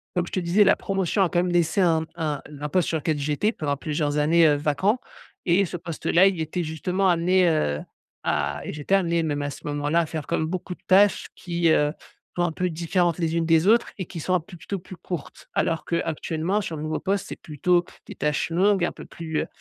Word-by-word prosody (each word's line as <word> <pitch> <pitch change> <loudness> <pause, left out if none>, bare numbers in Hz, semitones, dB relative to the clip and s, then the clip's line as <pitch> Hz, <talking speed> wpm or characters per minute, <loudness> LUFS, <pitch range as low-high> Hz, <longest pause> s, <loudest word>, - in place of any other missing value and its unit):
comme 175 -1 +1
je - - -10
te - - +1
disais, 175 +5 +4
la 200 - +5
promotion 195 0 -1
a 175 - +1
quand 175 - +1
même 180 - -1
laissé 175 +3 +2
un 165 -3 +4
m 160 - -6
un 155 -4 -2
n 150 - -11
un 150 - 0
poste 180 +2 +1
sur 160 - 0
lequel 155 0 -1
j'étais 150 +9 0
pendant 145 -9 -2
plusieurs 150 0 -1
années, 160 +2 +5
heu, 145 - +4
vacant 155 - +1 0.5
et 185 +3 +3
ce 175 - -5
poste-là, 170 +2 +2
il 185 -4 0
était 165 +3 -2
justement 180 +5 -1
amené, 180 +1 +3
heu, 75 - 0 0.4
à 70 0 -1
et - - -5
j'étais 150 +6 0
amené 170 -3 +2
même 145 -2 -1
à 145 - -2
ce - - -11
moment-là, 145 +3 +1
à 165 - -1
faire 155 -1 -5
comme 160 - 0
beaucoup 180 +2 -4
de - - -33
tâches 200 +2 +4
qui, 170 -2 0
heu, 150 -1 +3 0.4
sont 175 - +2
un 175 - +1
peu 180 +3 -1
différentes 170 +1 0
les 165 -1 0
unes 165 - +1
des 165 +2 +3
autres 235 +2 +4
et 185 - -4
qui 170 - -8
sont 185 - -1
un - - +3
peu 175 +1 -13
plutôt 180 +4 -5
plus 185 0 -11
courtes. 170 -4 -7
Alors 165 -2 0
qu'actuellement 170 +3 -1
sur 165 - -5
le 150 - -5
nouveau 155 0 -2
poste, 200 0 -1
c'est - - -6
plutôt, 175 +4 +1 0.2
des - - -8
tâches 150 +2 -1
longues 190 +2 +3
et - - +3
un - - -4
peu - - -10
plus, 160 -2 -4
heu - - -4
170 Hz, 245 wpm, -24 LUFS, 155-180 Hz, 0.5 s, la